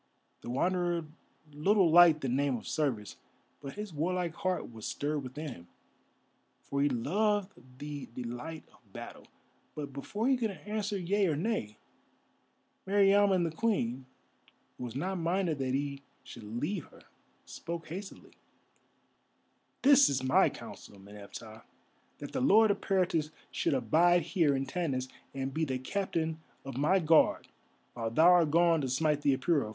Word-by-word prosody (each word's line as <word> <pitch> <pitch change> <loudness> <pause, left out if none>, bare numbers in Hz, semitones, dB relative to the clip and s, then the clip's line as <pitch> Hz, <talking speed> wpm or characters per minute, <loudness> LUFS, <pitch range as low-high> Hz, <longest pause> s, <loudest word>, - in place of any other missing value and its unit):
The - - -8
Wanderer 175 +4 0 0.5
little 185 +3 +3
liked 165 -2 +7
the 135 - -2
name 135 +1 +1
of - - -10
service, 130 -10 -2 0.4
but 140 -1 -8
his 210 -3 -6
warlike 170 +2 -1
heart 185 -7 -2
was 110 -2 -7
stirred 145 0 -2
within 145 +4 -6
him, 85 -9 -11 1.0
for 140 0 -2
he 145 - +3
loved 200 - 0 0.3
the 145 0 -6
delight 125 +7 -7
of - - -26
battle. - - -9 0.5
But 145 -2 -6
before 205 - -3
he 265 -1 +3
could 230 -3 -1 0.2
answer 210 -1 -2
yea 195 +2 +1
or 155 - +1
nay, 150 - -2 1.1
Meriamun 200 -1 +4
the 160 - -7
Queen, 135 - -1 0.7
who 125 - -4
was 120 0 -7
not 185 +6 -2
minded 170 -2 0
that 130 -1 -1
he 140 0 -3 0.2
should 115 - -11
leave 170 +2 -2
her, - - -18 0.4
spoke 170 -1 -7
hastily: 190 +4 -8 1.5
"This 280 +1 +7
is 130 -2 -1
my 130 0 +4
counsel, 100 - -11
Meneptah, 105 +3 -11 0.6
that - - -8
the - - -2
Lord 215 - +5
Eperitus 180 -6 0 0.2
should - - 0
abide 175 +5 +3
here 160 -3 +2
in 135 0 -1
Tanis 135 -4 -2 0.3
and 135 0 -3
be 160 - -1
the 130 -4 -1
Captain 160 +2 -2 0.3
of 135 -2 -6
my 150 +8 +3
Guard 160 -3 +3 0.4
while 115 -1 -3
thou 160 +10 +5
art 175 -3 +5
gone 165 0 +4
to 135 - -2
smite 150 +3 +1
the 140 -2 +2
Apura. 140 -5 +1
155 Hz, 150 wpm, -31 LUFS, 135-185 Hz, 1.5 s, liked